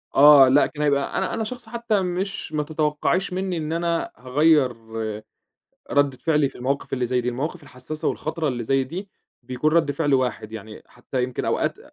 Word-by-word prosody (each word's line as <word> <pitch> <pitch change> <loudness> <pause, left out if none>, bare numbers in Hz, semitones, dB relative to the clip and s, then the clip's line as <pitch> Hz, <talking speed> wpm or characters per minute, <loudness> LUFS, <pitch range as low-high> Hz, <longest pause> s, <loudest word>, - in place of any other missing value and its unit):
آه، 145 -1 +9
لأ، 140 +3 +5
كان 150 - -8
هيبقى 140 -1 +1
أنا - - -1
أنا 225 - -1
شخص 230 0 -7
حتّى 230 -3 0
مش 185 0 -3
ما 150 - 0
تتوقعيش 155 +5 0
مِنّي 185 -1 -2
إن 155 0 -3
أنا 170 0 -1
هاغيّر 140 +1 +3 1.2
ردّة 145 -2 +2
فعلي 150 -1 +1
في - - -14
المواقف 135 +3 -3
اللي 125 -2 0
زي 125 +1 +1
دي، 125 - -3
المواقف 135 +7 -3
الحساسة 145 +3 -5
والخطرة 160 0 -2
اللي 120 -3 -2
زي 135 +3 +2
دي 180 +9 -7 0.3
بيكون 130 +5 -1
رد 165 -3 +3
فعل 145 -1 +1
واحد 125 -4 -1
يعني، 110 0 -9
حتّى 125 +1 -4
يمكن 125 0 -3
أوقات - - 0
145 Hz, 180 wpm, -23 LUFS, 130-165 Hz, 1.2 s, آه